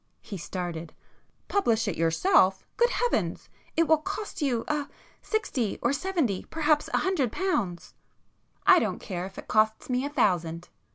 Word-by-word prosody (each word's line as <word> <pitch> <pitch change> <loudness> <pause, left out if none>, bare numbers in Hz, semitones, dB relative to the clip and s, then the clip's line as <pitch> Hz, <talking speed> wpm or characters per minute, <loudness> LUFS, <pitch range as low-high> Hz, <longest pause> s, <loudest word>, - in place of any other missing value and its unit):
He 205 - -7
started. 170 -2 -5 0.5
"Publish 230 - +1
it 195 - -1
yourself! 190 - +3
Good 475 0 +4
heavens!—it 475 -8 -1
will 315 -1 +5
cost 395 +2 -5
you—ah!—sixty 285 - -2
or 240 - +1
seventy, 295 - -1
perhaps 305 -2 +1
a - - +2
hundred 310 - +1
pounds." 235 - -2 0.7
"I 380 -3 +8
don't 210 -5 -1
care 180 -1 -5
if 190 - -15
it - - -8
costs 220 +3 +2
me 250 +1 +1
a 285 - -2
thousand!" 175 - 0
245 Hz, 135 wpm, -27 LUFS, -, 0.7 s, I